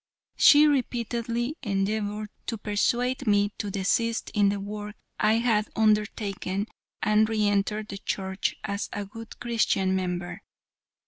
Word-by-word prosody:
She 295 +1 +7
repeatedly 240 -1 -1
endeavored 210 0 -1 0.2
to 230 - -2
persuade 245 +5 0
me 205 0 +3
to 205 - -2
desist 225 +4 0
in 205 -2 +4
the 200 0 -1
work 210 +1 -6 0.2
I 215 +1 +4
had 225 -2 +2
undertaken 210 -2 0 0.4
and 215 +1 +3
re 215 -1 +1
enter 205 +1 +1
the 200 -2 -8
Church 190 0 -2
as 200 0 -3
a 205 0 -3
good 225 +3 -11
Christian 220 -5 +1
member. 180 -1 -3
210 Hz, 130 wpm, -27 LUFS, 200-230 Hz, 0.4 s, She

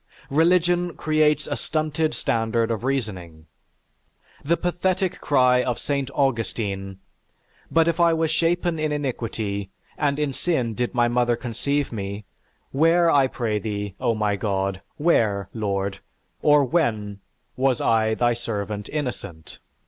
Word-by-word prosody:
Religion 175 +2 +3
creates 155 -1 +2
a 145 - -2
stunted 155 +1 -1
standard 115 0 0
of 115 0 -3
reasoning. 95 -12 -3 1.0
The 170 +4 +2
pathetic 185 +1 -1
cry 125 -3 +4
of 125 -2 -1
St. 140 -2 -2
Augustine, 105 -7 -1 0.7
"But 165 0 +3
if 170 0 0
I 170 -1 +5
was 160 -1 +1
shapen 170 0 +1
in 155 -1 0
iniquity, 115 -8 -3 0.3
and 140 -1 +1
in 150 -2 -1
sin 130 -8 -1
did 125 +2 -2
my 120 -1 +4
mother 120 0 +2
conceive 130 +4 -2
me, 100 -1 -5 0.5
where 165 +4 +4
I 140 -3 +4
pray 115 -5 -2
thee, 105 -2 -4
O 115 - +1
my 105 -1 0
God, 95 -2 -2 0.2
where, 105 - +2
Lord, 100 -3 -2 0.4
or 150 -1 +5
when 110 - 0 0.4
was 130 -1 +1
I, 110 -1 +2
thy 120 0 +2
servant 105 -3 -4
innocent?" 125 - -5
125 Hz, 135 wpm, -24 LUFS, 105-155 Hz, 1.0 s, I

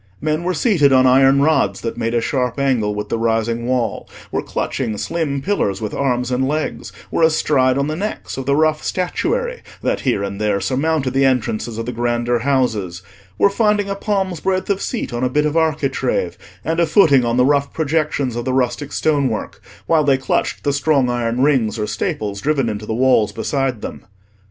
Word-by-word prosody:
Men 155 +2 -1
were 180 0 -1
seated 160 - +3
on 130 -1 +5
iron 135 +2 +5
rods 125 -11 +1
that 115 - -3
made 115 0 -2
a 120 - +2
sharp 125 -1 -1
angle 120 -7 +1
with 105 0 -4
the 115 - -1
rising 115 +1 0
wall, 125 -3 -1 0.2
were - - -1
clutching 115 -6 -3
slim 140 -3 -2
pillars 105 - 0
with 105 -2 -4
arms 125 -2 -1
and 130 +1 +1
legs, 150 +2 -3 0.2
were - - 0
astride 145 -5 +3
on 140 - +1
the 155 +1 -2
necks 205 +5 -4
of 135 -1 -6
the 140 - +3
rough 155 0 +2
statuary 485 - -2 0.2
that - - 0
here 120 -7 0
and 100 +1 -5
there 105 -2 +1
surmounted 135 +5 0
the 135 +1 +2
entrances 120 -3 0
of 115 - -3
the 125 - -3
grander 120 0 0
houses, 110 -9 -1 0.3
were - - +5
finding 210 -1 +1
a - - -1
palm's 195 -4 -1
breadth 190 +2 -1
of 195 - -1
seat 235 - -3
on 120 +1 -2
a 125 - +2
bit 150 +3 +1
of 150 +1 -1
architrave, 140 - 0 0.3
and 165 +1 0
a 170 - +3
footing 155 -6 +5
on 120 0 0
the 125 - +4
rough 140 0 +2
projections 150 -5 -1
of 120 - -3
the 130 - -2
rustic 130 +3 -1
stonework, 140 -8 -1 0.2
while 160 -2 +3
they 140 -2 +3
clutched 130 - -1
the 145 - +1
strong 140 -3 +2
iron 120 +1 0
rings 125 -7 +2
or 105 - -1
staples 105 -1 -3
driven 140 -5 +1
into 105 0 -5
the 110 - -2
walls 125 -4 +3
beside 135 -5 -2
them. - - -7
135 Hz, 200 wpm, -19 LUFS, 115-155 Hz, 0.3 s, on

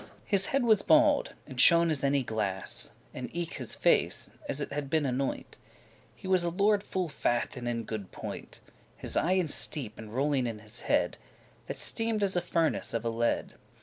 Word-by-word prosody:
His 195 -1 +2
head 275 -1 +1
was 220 -4 +4
bald, 305 +1 +4
and 130 -3 -2
shone 170 -1 +6
as 145 -3 +1
any 140 -1 +2
glass, 105 -5 -2 0.2
And 130 - -6
eke 170 -1 -3
his - - -4
face, - - +2 0.2
as 135 - 0
it 145 - -3
had 145 -1 -3
been 155 0 +1
anoint; 130 +1 -2 0.6
He - - -10
was 185 -1 +4
a 170 - +1
lord 200 +3 +2
full 185 -3 -2
fat 120 -5 -1
and 125 -1 -5
in 115 -1 -1
good 105 -3 -6
point; - - -8 0.4
His - - -5
eyen 180 0 +2
steep,* 135 -6 0
and 110 -1 -9
rolling 135 0 +1
in 115 -2 -4
his 105 0 -5
head, - - +3
*deep - - -16
set - - -29
That - - -5
steamed 225 -2 0
as 195 -2 0
a 175 - +2
furnace 165 -7 0
of 115 0 -2
a - - +1
lead. 115 +1 -1
145 Hz, 200 wpm, -29 LUFS, 120-185 Hz, 0.6 s, shone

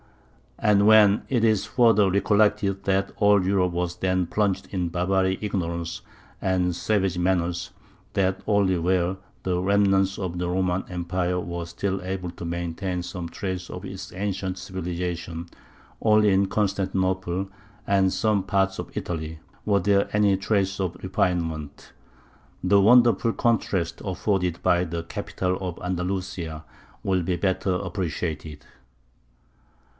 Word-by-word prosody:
And 100 -1 +3
when 105 -2 +6
it 120 -4 +1
is 110 -3 +3
further 115 -5 +4
recollected 100 0 +2
that 95 0 +1
all 100 -2 +4
Europe 95 -1 +2
was 90 0 -2
then 95 -1 +1
plunged 100 0 0
in 90 -4 -1
barbaric 95 +2 0
ignorance 85 -5 -3 0.4
and 90 -2 +1
savage 95 0 0
manners, 90 -1 0
and 95 -2 -3
that - - -19
only 100 -3 +3
where 90 +2 +1 0.3
the 90 -1 0
remnants 95 0 +2
of 90 -3 -3
the 90 0 -2
Roman 90 0 0
Empire 90 0 -1
were 85 -1 -4
still 95 +3 -3
able 90 -1 -3
to 85 - -8
maintain 85 +2 -3
some 90 -1 -6
trace 95 0 -4
of - - -7
its - - -7
ancient 95 -1 -3
civilization, 85 -2 -4 0.5
only 105 -2 +4
in 95 +1 +3
Constantinople 95 -2 -1 0.4
and 95 -1 +3
some 105 -2 +2
parts 95 -1 +1
of - - -7
Italy, 80 -2 -4 0.3
were 100 -2 +3
there 100 0 +2
any 105 -2 +4
traces 100 -1 0
of 95 -3 -2
refinement, 80 -6 -2 0.7
the 100 +2 +5
wonderful 120 +1 +5
contrast 95 -7 0
afforded 95 -2 -1
by 90 0 +3
the 85 -1 -4
capital 90 +2 -3
of 90 -3 -5
Andalusia 90 -3 -3 0.4
will 95 -2 +1
be 90 +1 -1
better 95 +1 0
appreciated. 85 -5 -4
95 Hz, 130 wpm, -25 LUFS, 90-100 Hz, 0.7 s, when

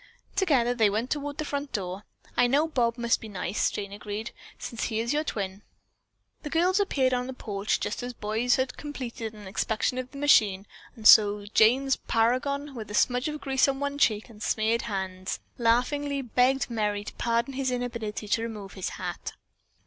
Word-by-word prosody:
Together 280 -11 +3
they 225 -4 +3
went 220 +5 -2
toward 290 -1 -2
the 310 - -2
front 285 -1 -3
door. 190 0 -4 0.3
"I 245 - +4
know 290 +6 +3
Bob 240 -6 0
must 235 -1 +1
be 220 - -8
nice," 195 +1 -1
Jane 200 -1 -5
agreed, 210 +2 -5 0.3
"since 235 - -4
he 220 -1 -1
is 235 +4 0
your 300 +1 +1
twin." 200 -7 -4 0.8
The 300 - -6
girls 355 +5 +2
appeared 270 -10 +2
on 250 0 0
the 260 - -5
porch 205 -3 -2
just - - -3
as 245 0 -5
the - - -37
boys 220 +4 +1
had 260 -1 -2
completed 240 -6 -6
an 210 -1 -11
inspection 220 +5 -1
of 255 0 -5
the 280 - -11
machine 210 -9 +4 0.3
and 220 -3 -12
so 205 -1 +7
Jane's 260 +5 +4
"paragon," 275 +5 0
with 220 -4 -7
a 210 - -4
smudge 250 +4 +2
of 300 -1 -4
grease 270 -1 +2
on 270 0 -1
one 285 0 -2
cheek 215 -6 +2
and 215 -3 -15
smeared 220 +1 +1
hands, 185 -1 -3 0.2
laughingly 275 +4 +1
begged 250 +2 +2
Merry 210 -2 -1
to - - -8
pardon 235 +3 0
his 265 0 -1
inability 235 -4 -3
to 225 - +2
remove 215 -4 -6
his 190 - -3
hat. - - -5
235 Hz, 190 wpm, -27 LUFS, 215-270 Hz, 0.8 s, so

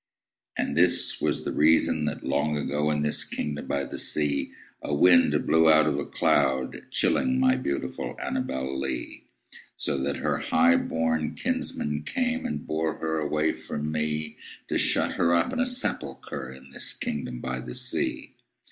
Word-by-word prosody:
And 70 - -1
this 85 +2 +4
was - - 0
the - - -2
reason 80 +2 +3
that, - - -4
long 75 +2 0
ago, 75 +1 -1
In 75 -1 0
this 75 - +1
kingdom 75 -1 -4
by 70 -1 -1
the - - -6
sea, 75 -2 0 0.3
A 75 - -2
wind 85 +3 +4
blew 80 0 +4
out 75 -1 +5
of 75 - +1
a 70 - -4
cloud, 65 -2 0
chilling 130 0 +1
My 130 0 +4
beautiful 100 - -4
ANNABEL 65 0 -3
LEE; 65 -2 -5 0.5
So 70 -2 0
that 70 +1 -1
her - - -1
highborn 80 -1 +1
kinsmen 75 0 -2
came 250 - -1
And - - -5
bore 80 0 -1
her 80 0 -2
away 75 +1 0
from 75 +1 -5
me, 75 0 -2 0.3
To - - +1
shut - - +3
her 85 0 +3
up 85 - +1
in - - -2
a 250 - +2
sepulchre 70 - -2
In 65 +1 -13
this - - 0
kingdom 65 -4 -4
by 65 0 -4
the 60 -1 -7
sea. - - -2
75 Hz, 165 wpm, -26 LUFS, 70-80 Hz, 0.5 s, out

